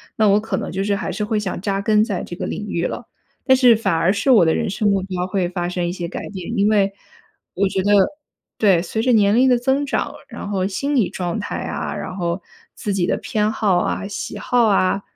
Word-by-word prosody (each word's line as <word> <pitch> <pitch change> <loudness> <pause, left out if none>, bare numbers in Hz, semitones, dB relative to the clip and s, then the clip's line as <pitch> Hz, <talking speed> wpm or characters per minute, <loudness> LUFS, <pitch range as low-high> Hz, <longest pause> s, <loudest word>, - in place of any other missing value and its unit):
那 215 -1 +3
我 200 +1 +4
可 215 -2 -3
能 - - -4
就 190 - -2
是 200 0 0
还 195 - -3
是 210 +4 -2
会 215 0 -1
想 195 -4 -3
扎 195 0 -1
根 210 0 +3
在 200 -6 -3
这 175 - -8
个 - - -3
领 210 - -5
域 170 -3 -1
了。 - - -4 0.4
但 260 -1 +5
是 250 -3 +6
反 210 -4 0
而 165 +3 +2
是 210 +6 +1
我 215 -9 +6
的 160 - +2
人 - - -1
生 205 +2 0
目 195 -1 +2
标 185 -1 -3
会 185 -2 -1
发 175 -1 -3
生 180 -1 -2
一 - - -2
些 175 -1 -4
改 170 - -6
变， 205 +3 -5
因 200 +1 +3
为 200 -2 +2 0.6
我 200 +2 +2
觉 190 0 -1
得 205 - +2 0.7
对， 195 -6 +4
随 205 +5 -3
着 250 +2 +2
年 210 -2 +4
龄 260 +2 +5
的 245 - +4
增 265 +4 0
长， - - -2 0.2
然 - - -7
后 190 -2 0
心 275 +10 -2
理 235 -8 +2
状 175 0 -3
态 210 - -4
啊， - - -4
然 185 - -6
后 175 0 -2 0.3
自 205 - -3
己 185 -3 +1
的 - - 0
偏 215 -2 -1
好 205 -4 +1
啊、 195 - -2
喜 200 - -5
好 245 -2 +2
啊、 195 -1 +2
200 Hz, 265 characters per minute, -20 LUFS, 185-220 Hz, 0.7 s, 是